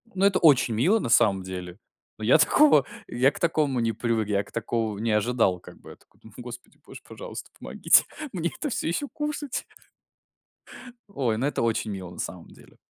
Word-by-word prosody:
Ну, 195 +1 +2
это 195 -2 +3
очень 135 -8 +4
мило 175 - +2
на 115 - -4
самом 100 -6 +3
деле. 90 +1 -8 0.4
Но 110 - -5
я 120 - +6
такого 280 - +5 0.2
я 130 +4 +2
к - - -10
такому 155 -7 0
не 115 -1 0
привык. 115 -1 -1
Я 100 -1 0
к - - -18
такому 115 -2 -3
не 110 +1 -2
ожидал. 105 -4 +1
Как - - -15
бы - - -14
я - - -12
такой: - - -30
"Ну, 110 - -15
Господи, 125 0 -11
боже, - - -12
пожалуйста, - - -9
помогите - - +5 0.3
мне 170 -2 -2
это 300 - -3
всё 225 - -2
ещё 285 +12 -1
кушать!" 295 -2 -4 1.5
Ой, 115 -5 -1
ну 135 - -1
это 145 - -2
очень 115 -1 -1
мило, 95 -3 -7
на 90 - -13
самом 90 -3 -6
деле. - - -19
120 Hz, 195 wpm, -25 LUFS, 105-160 Hz, 1.5 s, я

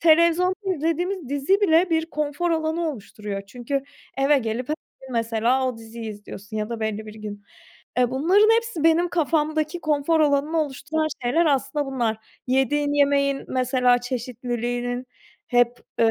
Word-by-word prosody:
televizyonda 335 +3 +5 0.2
izlediğimiz 330 +1 -1
dizi 285 +9 +1
bile 345 -1 +4
bir 320 0 +1
konfor 300 +3 -1
alanı 320 +1 0
oluşturuyor 210 -4 -6
çünkü 250 +5 -3 0.4
eve 280 +1 +4
gelip 235 +2 -3
h 305 - +1 0.3
gün 265 -1 -10
mesela 230 +3 +1
o 250 - -4
diziyi 225 0 -7
izliyorsun 205 0 -9
ya 210 0 -2
da 235 -1 -5
belli 220 0 -2
bir 215 - -9
gün. 210 -2 -8 0.5
Eee, 250 -1 +3
bunların 380 +11 +4
hepsi 460 -9 -2
benim 330 +2 +4
kafamdaki 315 0 0
konfor 310 +1 +1
alanını 300 +2 +2
oluşturan 305 +2 -2 0.2
şeyler 280 +8 +2
aslında 275 0 +1
bunlar. 240 -5 -1 0.3
Yediğin 270 +3 +1
yemeğin 280 -1 +2
mesela 255 -1 +3
çeşitliliğinin 245 0 -3 0.4
hep, 245 0 +2 0.2
ııı, 225 -1 +5
275 Hz, 145 wpm, -24 LUFS, 240-315 Hz, 0.5 s, televizyonda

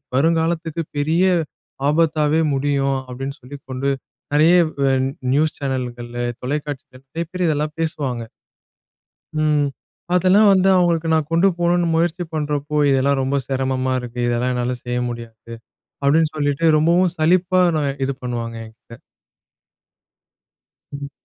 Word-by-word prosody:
வருங்காலத்துக்கு 165 +2 +1
பெரிய 160 +5 +2 0.7
ஆபத்தாவே 155 0 +2
முடியும் 135 0 0
அப்படின்னு" 135 +3 -6
சொல்லி 130 +3 -9
கொண்டு, 130 +2 -2 0.4
நெறய 155 +4 +5 0.3
வ - - +3 0.5
நியூஸ் 155 +2 +1
சேனல்கள்ல, 120 -3 -4 0.2
தொலைக்காட்சிகள், 140 -1 -5
நெறைய 165 +5 -4
பேர் 180 -1 -1
இதெல்லாம் 150 -1 -1
பேசுவாங்க. 140 -7 -2 1.2
ம், 150 -1 +2 0.5
அதெல்லாம் 190 +4 +5
வந்து 190 0 +3
அவுங்களுக்கு 170 -2 +2
நான் 155 -2 0
கொண்டு 170 +4 +4
போணும்னு 175 0 +2
முயற்சி 170 +2 0
பண்ணுறப்போ, 150 -1 -2
"இதெல்லாம் 135 +1 +2
ரொம்ப 135 +2 0
செரமமா 130 -1 -1
இருக்கு, 125 0 -9
இதெல்லாம் 120 +1 0
என்னால 125 +1 -1
செய்ய 125 0 -2
முடியாது" 115 -1 -9 0.5
அப்டின்னு 155 +3 +3
சொல்லிட்டு, 145 +1 -1
ரொம்பவும் 170 +3 +3
சலிப்பா 180 +3 +3 0.2
நா 155 - 0 0.2
இது 140 - -1
பண்ணுவாங்க 115 -2 -4
என்கிட்ட. 115 +1 -15 1.9
ம். 140 0 -6
145 Hz, 120 wpm, -20 LUFS, 130-165 Hz, 1.9 s, நெறய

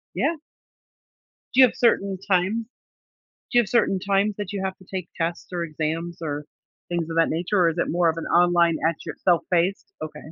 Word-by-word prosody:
Yeah. 335 - +1 1.2
Do 260 - +6
you 255 - +9
have - - -8
certain 200 -5 +2
times 195 +5 +1 0.9
do 240 - +5
you - - +7
have 215 - -5
certain 195 -5 +2
times 200 +2 +1
that 205 -1 -4
you 200 -2 -3
have 190 0 -3
to 185 - -18
take 185 -2 -4
tests 170 0 -3
or 175 -1 -2
exams 165 +2 -3
or 150 -2 -3 0.5
things 170 -2 -1
of 165 - -3
that 165 - +4
nature, 175 +5 0
or 170 -2 +5
is 165 - -5
it - - +1
more 170 0 +2
of 160 - -2
an 165 - -4
online 175 -1 +3
at 165 - -3
your - - -4
self-paced? 180 +1 +1
Okay. 155 0 -8
175 Hz, 205 wpm, -24 LUFS, 165-195 Hz, 1.2 s, you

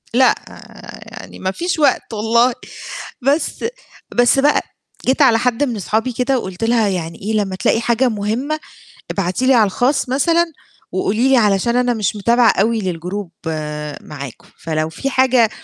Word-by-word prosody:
لأ، 255 +2 +5 0.7
يعني - - -11
ما 190 - -1
فيش 335 - -2
وقت 285 -5 +2
والله 230 +3 +2 0.7
بس 285 - 0 0.5
بس 245 +2 +4
بقى، 290 +2 +3 0.5
جيت 265 +4 +2
على 245 -5 +6
حد 250 +2 +1
من 250 -5 -1
أصحابي 220 +5 -1
كده 255 +2 +1
وقُلت 190 -1 -6
لها 225 -1 +3
يعني 170 -3 -4
إيه: 215 +3 -2
"لمّا 200 -3 0
تلاقي 225 +4 +1
حاجة 240 +2 +2
مُهمة 230 +8 -2 0.5
ابعتي 195 +6 -1
لي 265 - +6
على 230 -4 +5
الخاص 255 +7 0
مثلًا 330 +6 +3 0.5
وقولي 215 +7 +1
لي 270 - +5
علشان 210 +1 +2
أنا 245 0 +2
مش 215 -2 -1
متابعة 235 +3 +4
أوي 225 +3 +1
للجروب 180 +1 -4 0.7
معاكم، 140 -5 -9 0.2
فلو 155 -1 -1
في 215 +12 -3
حاجة 255 -3 +3
230 Hz, 155 wpm, -18 LUFS, 200-260 Hz, 0.7 s, على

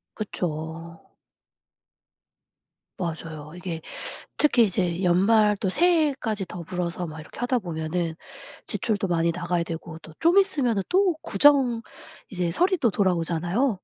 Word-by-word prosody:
그쵸. 165 -4 -5 2.0
맞아요. 160 -3 -5
이게 180 -3 -5 0.6
특히 270 -6 +5
이제 180 -2 0
연말 210 +4 +4
또 195 - -1
새해까지 285 - +2
더불어서 175 0 -4
막 155 -1 -8
이렇게 150 - -12
하다 245 0 +1
보면은 165 -1 -3 0.5
지출도 205 -3 -1
많이 170 -1 +1
나가야 175 0 -1
되고 165 -1 -7
또 160 - -14
좀 345 +4 +4
있으면 270 - +1
또 370 -2 +3
구정, 265 -6 +4 0.5
이제 180 -3 -1
설이 365 - +2
또 240 - +2
돌아오잖아요. 180 - +1
180 Hz, 260 characters per minute, -25 LUFS, 170-240 Hz, 2.0 s, 특히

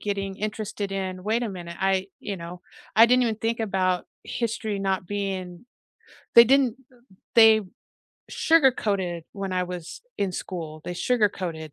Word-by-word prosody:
getting 195 -1 -3
interested 210 -1 -4
in 185 -1 -4
wait 220 +4 0
a 230 - -2
minute, 175 -3 -7
I 190 0 +1
you 200 - -4
know, 175 +1 -8 0.4
I 225 +2 +9
didn't 250 +1 +4
even 230 -3 +1
think 225 +1 -2
about 185 -4 0 0.2
history 220 -3 -3
not 190 -2 -1
being 190 -1 -4 0.7
they 235 - +11
didn't 260 -2 +3
th 265 - -26 0.5
they 220 -1 +8 0.7
sugar-coated 205 - +2
when 195 -2 -4
I 180 0 +1
was 180 -2 -7 0.2
in 195 -2 -1
school, 165 -4 -6
they 175 - -3
sugar-coated. 180 -8 -1
195 Hz, 150 wpm, -25 LUFS, 180-220 Hz, 0.7 s, they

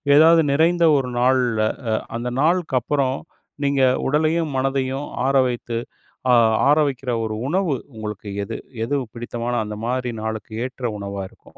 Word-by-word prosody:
எதாவது 165 +2 +7
நிறைந்த 170 +4 +3
ஒரு 130 -2 -1
நாள்ல, 125 -3 +2 0.6
அந்த 120 +1 -3
நாளுக்கு 165 -2 +2
அப்புறம், 135 -2 0 0.5
நீங்க 140 -1 +2 0.3
உடலையும் 155 +1 +1
மனதையும் 135 +1 -1 0.2
ஆற 140 - +1
வைத்து 120 -1 -4 0.9
ஆற 150 - +5
வைக்குற 130 -2 -3
ஒரு 110 - -3
உணவு 180 -1 +1 0.2
உங்களுக்கு 105 -1 -6
எது? - - -5 0.3
எது 145 - -1 0.2
பிடித்தமான 120 0 -4
அந்த 105 0 -5
மாதிரி 125 +1 -1
நாளுக்கு 110 0 -4
ஏற்ற 130 -1 -4
உணவா 100 0 -5
இருக்கும்? - - -21
130 Hz, 135 wpm, -22 LUFS, 120-145 Hz, 0.9 s, எதாவது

